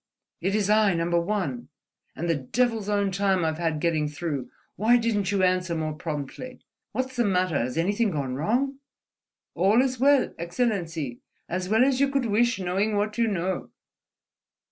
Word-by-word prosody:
It 190 +4 0
is 210 -2 +1
I, 210 -3 +4
Number 170 +1 +1
One. 210 +6 -3 0.5
And 170 - -3
the 165 - +3
devil's 220 - -1
own 200 -1 +1
time 190 -2 +1
I've 160 0 -1
had 165 -3 0
getting 155 -2 +1
through. 145 -4 -4 0.3
Why 230 +5 +4
didn't 210 -5 0
you 195 -2 +1
answer 180 -2 +1
more 155 -1 -2
promptly? 160 - -6 0.3
What's 260 +3 -3
the 240 - +2
matter? 185 -6 +1
Has 125 +5 -2
anything 205 +6 +1
gone 140 -7 -2
wrong?" 250 - 0 0.7
"All 195 +7 +3
is 255 -1 +1
well, 280 0 +4
Excellency, 170 - -2 0.3
as 180 +1 -3
well 220 +4 +4
as 265 -1 +1
you 280 0 +3
could 275 -2 0
wish, 235 +3 +2
knowing 195 +3 0
what 210 +2 -1
you 230 - +3
know." 185 -3 -2
195 Hz, 165 wpm, -26 LUFS, 170-230 Hz, 0.7 s, I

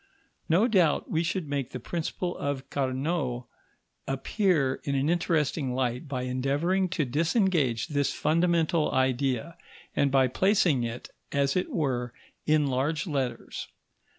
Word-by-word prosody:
No 185 +8 +4
doubt 180 - +2
we 160 - +2
should 170 -1 -2
make 140 -3 -2
the 125 - -6
principle 175 +5 -3
of 140 -1 -3
Carnot 130 -1 -1 0.6
appear 135 0 +1
in 140 - -1
an 135 +3 +1
interesting 150 -6 0
light 125 +2 -1
by 130 -3 -3
endeavouring 145 +9 0
to 165 -4 0
disengage 160 - +1
this 145 -2 +1
fundamental 165 -1 +2
idea, 130 +3 0 0.4
and 140 - +3
by 135 -1 +4
placing 185 - +2
it, 120 +1 -5 0.2
as 140 -1 +1
it 180 - 0
were, 125 - -1 0.3
in 155 -1 +4
large 140 +4 0
letters. 135 -7 -3
145 Hz, 130 wpm, -28 LUFS, 130-170 Hz, 0.6 s, No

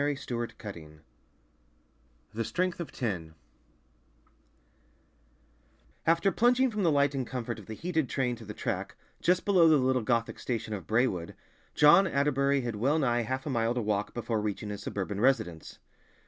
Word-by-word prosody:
The 145 0 +1
Strength 120 -3 -5
of - - -20
Ten 80 -7 -10 1.3
The 115 +1 -2
Strength 175 +11 -1
of 170 - -5
Ten 85 -9 -4 2.7
AFTER 170 +4 +3
plunging 250 +3 +3
from 210 -1 -2
the 170 -4 +3
light 140 -1 +3
and 130 -3 -3
comfort 120 -3 -4
of 100 - -13
the 110 - -6
heated 160 -1 -1
train 125 -3 0
to 115 - -11
the 105 0 -8
track, - - -3 0.3
just 180 +1 +2
below 180 -5 +5
the 155 - +6
little 130 -1 +2
Gothic 115 +1 -1
station 115 -3 -3
of 95 -6 -6
Braewood, 110 -7 0 0.4
John 170 +6 +7
Atterbury 140 -2 +1
had 120 -3 -4
well 135 +8 +2
nigh 120 -5 +1
half 130 +4 -3
a 150 - -2
mile 115 -1 0
to 125 - 0
walk 105 -1 -1
before 115 -2 -1
reaching 105 0 -3
his 100 0 -6
suburban 100 0 -4
residence. 90 -11 0
125 Hz, 165 wpm, -29 LUFS, 105-150 Hz, 2.7 s, John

